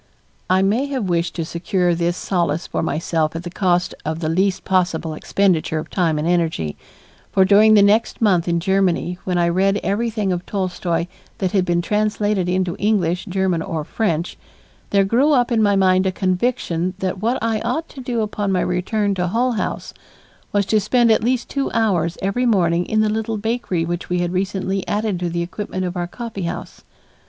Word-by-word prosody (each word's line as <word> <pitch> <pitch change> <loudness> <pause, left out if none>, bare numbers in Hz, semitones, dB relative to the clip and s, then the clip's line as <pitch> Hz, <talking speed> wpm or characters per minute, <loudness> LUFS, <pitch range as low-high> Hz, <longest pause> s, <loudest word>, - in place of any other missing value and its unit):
I 185 +1 +4
may 225 +8 +1
have 260 -8 -2
wished 170 0 0
to 165 - -2
secure 175 +2 0
this 170 +1 -1
solace 170 -3 -1
for - - -3
myself 160 0 -1
at 165 - -4
the 175 - -6
cost 180 -2 +1
of 155 +1 -2
the 155 -2 -2
least 190 +3 +1
possible 175 -4 0
expenditure 170 -1 +1
of 155 - -5
time 165 -5 +1
and 150 +2 -1
energy, 160 - 0 0.6
for 190 - +4
during 210 +3 +6
the 205 - +6
next 210 +3 +2
month 185 -6 +2
in 170 0 +1
Germany, 180 -1 0
when 180 -1 0
I 170 -1 +3
read 195 +3 +2
everything 210 -1 -1
of 175 0 -2
Tolstoy's 180 -3 -1 0.3
that 185 -2 -1
had 190 -3 +2
been 175 -1 +1
translated 210 -1 0
into 180 -1 0
English, 185 -4 +1
German, 190 -3 0
or 160 -1 -3
French, 170 -2 -2 0.5
there 200 -1 +3
grew 260 +9 +3
up 245 -2 +2
in 225 -2 +3
my 205 -1 +3
mind 185 -1 +3
a - - +1
conviction 185 -2 -1
that 185 0 -3
what 235 +4 +1
I 225 -1 0
ought 250 +9 -2
to 270 - -10
do 245 -2 -2
upon 205 -2 -2
my 185 - +1
return 200 +3 0
to 180 -1 -1
Hull 240 +7 +1
House 225 - -3 0.6
was 200 -1 +1
to 215 +2 +2
spend 230 +3 +3
at 220 - +3
least 245 +1 0
two 275 -1 -2
hours 185 -7 +1
every 245 +6 +1
morning 175 -5 +2
in 215 0 +2
the 215 - +2
little 220 +1 -2
bakery 215 -6 -1
which 175 +1 -4
we 180 - 0
had 175 0 -1
recently 190 0 -1
added 210 -3 -1
to 175 -1 -2
the 170 0 -2
equipment 185 +1 -4
of 180 0 -4
our 175 -1 -2
coffeehouse. 195 -4 -6
190 Hz, 195 wpm, -20 LUFS, 175-215 Hz, 0.6 s, during